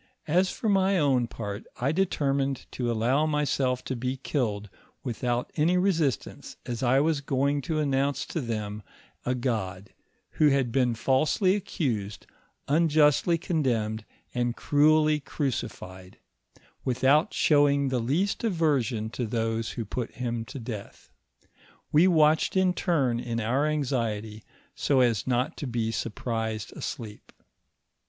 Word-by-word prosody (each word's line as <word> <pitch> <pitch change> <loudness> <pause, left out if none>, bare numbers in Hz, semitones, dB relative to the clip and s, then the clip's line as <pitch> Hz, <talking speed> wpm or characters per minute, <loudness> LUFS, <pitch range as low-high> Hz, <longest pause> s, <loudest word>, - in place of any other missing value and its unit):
As 180 +4 +3
for 225 - -4
my 195 -1 +3
own 135 -6 +2
part, 105 -3 -6 0.2
I 130 +3 +1
determined 140 -6 0
to 120 -2 -2
allow 125 +7 +2
myself 140 -4 0
to 130 - -3
be 125 +2 -3
killed 110 -7 -2 0.4
without 120 -1 -2
any 165 +4 +3
resistance, 170 -8 -1
as 120 -2 -4
I 130 +1 +3
was 150 0 +1
going 140 +1 0
to 160 +2 -2
an* 150 -2 0
nonnce 135 +1 0
to 165 - -2
them 105 -3 -4 0.5
a 125 - +1
God, 105 -6 -3 0.5
who 155 - +6
had 135 -4 +1
been 125 -2 +2
falsely 150 - +2
accused, 125 - -3 0.4
unjustly 155 +2 +3
condemned, 120 -11 -1 0.3
and 120 -1 -1
cruelly 155 +1 +3
crucified, 105 - -5 0.7
without 130 +5 +3
showing 140 -2 +3
the 130 -1 0
least 155 - 0
aversion 140 - 0
to 120 -1 -3
those 115 0 -2
who 115 - -4
put 115 +3 -4
him 120 -2 -3
to 140 - -8
death. 110 -4 -8 0.8
We 160 +5 +5
watched 155 0 +3
in 185 -1 +3
turn 140 -11 +1
in 115 -1 -3
our 130 +7 +1
anxiety 115 -8 -2 0.3
so 135 -3 +2
as 115 -4 +1
not 125 +2 0
to 145 - -4
be 115 -2 -1
surprised 110 -1 -3
asleep. 110 -6 -7
130 Hz, 135 wpm, -27 LUFS, 115-150 Hz, 0.8 s, who